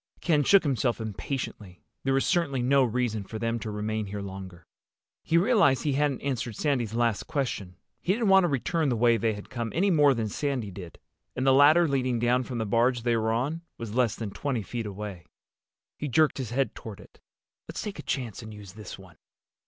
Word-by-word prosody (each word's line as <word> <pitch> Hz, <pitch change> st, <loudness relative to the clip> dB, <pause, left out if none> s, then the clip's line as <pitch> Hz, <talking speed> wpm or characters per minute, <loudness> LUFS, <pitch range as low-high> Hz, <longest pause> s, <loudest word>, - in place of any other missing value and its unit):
Ken 150 Hz, -4 st, +2 dB
shook 200 Hz, +6 st, +5 dB
himself 130 Hz, -5 st, 0 dB
impatiently. 110 Hz, -3 st, -5 dB, 0.2 s
There 135 Hz, -, +1 dB
was 135 Hz, -, +2 dB
certainly 140 Hz, -8 st, +1 dB
no 135 Hz, +2 st, +4 dB
reason 120 Hz, -3 st, -1 dB
for 110 Hz, +3 st, -7 dB
them 115 Hz, +1 st, -1 dB
to 110 Hz, -, -5 dB
remain 105 Hz, 0 st, -2 dB
here 100 Hz, 0 st, -5 dB
longer. 95 Hz, -2 st, -9 dB, 0.6 s
He 165 Hz, -, +2 dB
realized 195 Hz, -, +4 dB
that 150 Hz, -, -1 dB
he -, -, +1 dB
hadn't 145 Hz, -1 st, 0 dB
answered 125 Hz, -5 st, -2 dB
Sandy's 125 Hz, -6 st, -1 dB
last 115 Hz, -3 st, +1 dB
question. 125 Hz, -, -3 dB, 0.3 s
He 185 Hz, -, +1 dB
didn't 225 Hz, -1 st, 0 dB
want 195 Hz, -1 st, +7 dB
to -, -, +2 dB
return 155 Hz, +2 st, 0 dB
the 125 Hz, -, +1 dB
way 120 Hz, +1 st, +4 dB
they 115 Hz, -1 st, 0 dB
had 105 Hz, +2 st, -10 dB
come 120 Hz, -3 st, -3 dB
any 195 Hz, +4 st, +3 dB
more 145 Hz, -5 st, +5 dB
than 115 Hz, -2 st, -1 dB
Sandy 125 Hz, -2 st, -2 dB
did. 90 Hz, -2 st, -10 dB, 0.4 s
And 130 Hz, -, -1 dB
the 135 Hz, -, +6 dB
ladder 155 Hz, +5 st, +6 dB
leading 130 Hz, -3 st, 0 dB
down 120 Hz, +2 st, +2 dB
from 125 Hz, -, -5 dB
the 110 Hz, -, -1 dB
barge 120 Hz, +3 st, +2 dB
they 120 Hz, -1 st, +2 dB
were 110 Hz, 0 st, +1 dB
on 140 Hz, +9 st, -1 dB, 0.2 s
was 115 Hz, -3 st, -6 dB
less 125 Hz, -3 st, +2 dB
than 110 Hz, -3 st, -5 dB
twenty 125 Hz, -1 st, -2 dB
feet 115 Hz, +1 st, -4 dB
away. 100 Hz, -4 st, -7 dB, 0.7 s
He 150 Hz, -, -2 dB
jerked 150 Hz, +2 st, +2 dB
his 125 Hz, -5 st, -3 dB
head 135 Hz, +3 st, 0 dB
toward 110 Hz, -3 st, -9 dB
it. -, -, -17 dB, 0.5 s
"Let's -, -, -5 dB
take 205 Hz, -2 st, -6 dB
a -, -, -3 dB
chance 125 Hz, -5 st, -3 dB
and 110 Hz, -1 st, -9 dB
use 105 Hz, -3 st, -11 dB
this 105 Hz, -2 st, -9 dB
one." -, -, -16 dB
120 Hz, 215 wpm, -27 LUFS, 110-140 Hz, 0.7 s, want